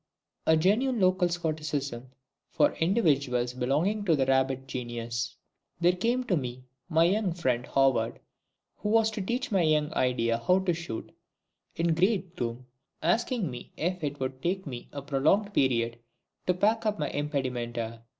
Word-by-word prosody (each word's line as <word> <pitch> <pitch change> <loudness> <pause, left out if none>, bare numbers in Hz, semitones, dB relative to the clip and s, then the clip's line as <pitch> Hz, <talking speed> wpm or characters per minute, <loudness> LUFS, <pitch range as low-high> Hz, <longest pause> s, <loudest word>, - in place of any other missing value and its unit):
a 160 - +6
genuine 220 +9 +2
local 185 -1 +3
Scotticism 150 -7 -3 0.4
for 150 -2 +3
individuals 140 - +2
belonging 150 +12 0
to 165 -4 +4
the 135 -2 +2
rabbit 130 0 +1
genius), 120 -1 -4 0.4
there 175 +1 +5
came 235 +8 0
to 205 -7 +1
me 125 -4 -4 0.3
my 160 +1 +4
young 190 +1 +2
friend 125 -8 0
HOWARD, 125 -4 +2 0.6
who 210 - -3
was 220 0 +4
to 215 -2 -4
teach 245 +7 -2
my 195 -3 +3
young 155 -2 +2
idea 115 -2 +1
how 180 +10 +3
to 190 -2 +1
shoot, 160 -9 -6 0.6
in 170 0 +1
great 185 +1 +1
gloom, 120 +1 -4 0.4
asking 220 - +1
me 125 - -9
if 180 +1 -2
it 145 0 -3
would 130 0 -4
take 190 +2 -1
me 125 -5 -7
a 140 -1 -6
prolonged 155 +10 +2
period 120 -5 +1 0.5
to 180 - +3
pack 215 +5 +2
up 210 - 0
my 150 -2 -2
impedimenta. 120 -6 -3
155 Hz, 155 wpm, -28 LUFS, 125-185 Hz, 0.6 s, a